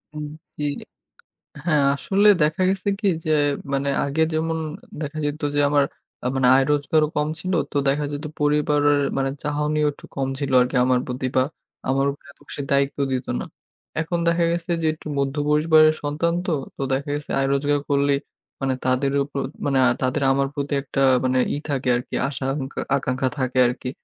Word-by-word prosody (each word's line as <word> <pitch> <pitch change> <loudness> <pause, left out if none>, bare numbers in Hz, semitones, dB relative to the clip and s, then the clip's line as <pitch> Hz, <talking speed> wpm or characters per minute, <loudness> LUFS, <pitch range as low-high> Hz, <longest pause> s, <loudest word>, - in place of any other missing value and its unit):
উম 150 0 -4 0.3
জ্বি। 150 - -2 1.0
হ্যাঁ, 150 -5 +3
আসলে 200 +8 +2 0.2
দেখা 155 +4 0
গেছে 195 +1 -1
কি? 210 - 0 0.2
যে 155 - 0 0.4
মানে 140 +1 0 0.2
আগে 140 +3 -1
যেমন 160 +1 0 0.4
দেখা 150 +1 -5
যেত 145 +1 -3
যে - - +2
আমার 145 -1 +3 0.5
মানে 130 -1 +3
আয় 135 - +5
রোজগারও 150 +2 +2
কম 150 0 +1
ছিল। 185 +3 -3 0.2
তো - - -1
দেখা 145 +2 +1
যেত 145 +2 -5
পরিবারের 145 -1 +3 0.2
মানে 135 0 +1
চাহনিও 150 +1 0
একটু - - -14
কম 135 -1 -1
ছিল 140 -2 -2
আরকি 125 +2 -1
আমার 130 -1 +3
প্রতি 125 +1 -2
বা 130 - +5 0.5
আমার 135 +1 +2
উপরে 140 0 -14
এত - - -27
বেশি - - -5
দায়িত্ব 140 0 +2
দিত 130 -1 -2
না। 65 - -4 0.6
এখন 170 +2 -2
দেখা 170 0 +3
গেছে 170 +1 -2
যে 160 - +1
একটু 155 - -11
মধ্য 140 0 0
পরিবারের 155 +1 +5
সন্তান 150 +3 0
তো। - - +1 0.2
তো - - -7
দেখা 140 +2 -2
গেছে 145 0 -6
আয় 135 - +1
রোজগার 145 +1 +1
করলেই 140 0 +2 0.4
মানে 135 -1 +1
তাদের 130 +2 +2
উপর 140 0 -5 0.3
মানে 140 -2 +1 0.2
তাদের 130 +2 0
আমার 135 0 +1
প্রতি 145 0 -3
একটা 135 0 -3 0.2
মানে 130 0 +2 0.2
ই - - -2
থাকে 135 -2 -2
আরকি। 120 - -4
আশা 135 -1 -5
আকাঙ্খা 135 -2 -5 0.2
আকাঙ্খা 130 -1 -1
থাকে 130 0 -1
আরকি। 125 +1 -4
145 Hz, 180 wpm, -23 LUFS, 135-150 Hz, 1.0 s, আয়